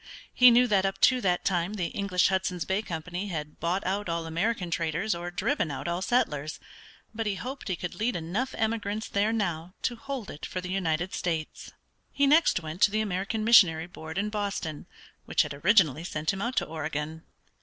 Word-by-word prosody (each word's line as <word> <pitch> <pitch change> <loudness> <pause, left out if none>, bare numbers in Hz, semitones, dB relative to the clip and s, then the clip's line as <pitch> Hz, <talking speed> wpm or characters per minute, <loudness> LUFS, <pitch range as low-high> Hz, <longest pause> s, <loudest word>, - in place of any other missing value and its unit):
He 250 0 +8
knew 245 +1 +6
that 205 -5 +2
up 195 0 -1
to 255 -1 +5
that 180 -4 +1
time 180 +2 0
the 180 -5 -2
English 190 -3 +1
Hudson's 185 -2 -1
Bay 190 +2 0
Company 180 +1 -5
had 150 -5 -5
bought 175 +4 -1
out 195 0 -1
all 165 0 -2
American 175 +3 -1
traders 165 +5 0
or 175 +1 -5
driven 175 - -1
out 145 +4 -5
all 170 +1 -1
settlers, 155 - 0 0.5
but 225 -1 -2
he 200 - 0
hoped 265 +6 -6
he 185 - 0
could 180 0 -5
lead 230 +3 -1
enough 180 +11 -2
emigrants 220 -1 -1
there 205 +2 +1
now 180 -5 -2
to 240 - 0
hold 260 -2 -6
it 145 - -11
for 185 - -4
the 180 0 -5
United 175 -2 -1
States. 160 -3 -3 0.4
He 280 - +2
next 300 - +4
went 160 +4 -7
to - - +7
the 215 +2 0
American 205 +2 -2
Missionary 180 -8 +6
Board 160 -1 -9
in 205 +2 0
Boston, 200 -7 -3 0.4
which - - +3
had - - -5
originally 165 - +3
sent 155 0 -2
him 195 - -5
out 240 +3 -2
to - - +2
Oregon. 155 0 -4
185 Hz, 195 wpm, -28 LUFS, 165-215 Hz, 0.5 s, He